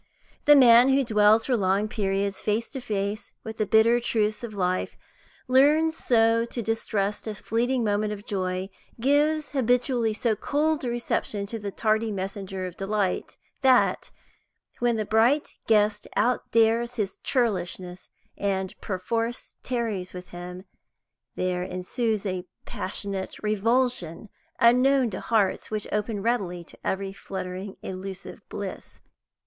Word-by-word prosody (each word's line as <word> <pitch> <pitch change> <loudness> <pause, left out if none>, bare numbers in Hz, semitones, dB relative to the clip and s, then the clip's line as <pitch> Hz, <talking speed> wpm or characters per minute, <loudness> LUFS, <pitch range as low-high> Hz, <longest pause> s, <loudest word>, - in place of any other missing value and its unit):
The 295 - +8
man 245 -1 +7
who 270 +1 +4
dwells 215 -1 +4
for 255 - +2
long 200 0 +1
periods 200 -2 -1
face 215 +2 -1
to 265 - -5
face 205 -2 -3
with 220 0 -7
the 215 - 0
bitter 225 +3 +5
truths 215 -2 -1
of 220 -3 -6
life 185 -1 -1 0.5
learns 300 +5 +4
so 230 -4 +3
to 235 0 -4
distrust 210 -2 -1
a 215 - -3
fleeting 240 +4 0
moment 210 0 0
of 205 0 -7
joy, 185 -1 -2 0.3
gives 295 +4 +2
habitually 245 -3 +1
so 225 0 +1
cold 300 +6 0
a 245 - -1
reception 235 -3 -2
to 225 +3 -6
the 205 -1 -4
tardy 215 +2 0
messenger 195 -1 -4
of 180 -1 -7
delight, 195 -1 -2 0.2
that, 260 -2 +3 0.7
when 240 -1 +2
the 215 -1 -1
bright 235 +8 +3 0.2
guest 210 -1 +2
outdares 235 0 +2
his 205 -5 -3
churlishness 185 -7 -2 0.3
and 190 -2 -2
perforce 225 +5 -3
tarries 220 -8 -3
with 180 0 -9
him, 180 +1 -8 0.7
there 180 -1 -1
ensues 205 +4 -2
a 185 -2 -3 0.2
passionate 195 0 -4
revulsion 215 -3 0 0.3
unknown 250 +1 +4
to 185 - -4
hearts 210 -5 0
which 215 -1 -3
open 210 -1 -2
readily 195 -7 -1
to - - -13
every 195 0 -2
fluttering 190 0 -6
illusive 190 0 -7
bliss. - - -7
215 Hz, 135 wpm, -26 LUFS, 195-240 Hz, 0.7 s, The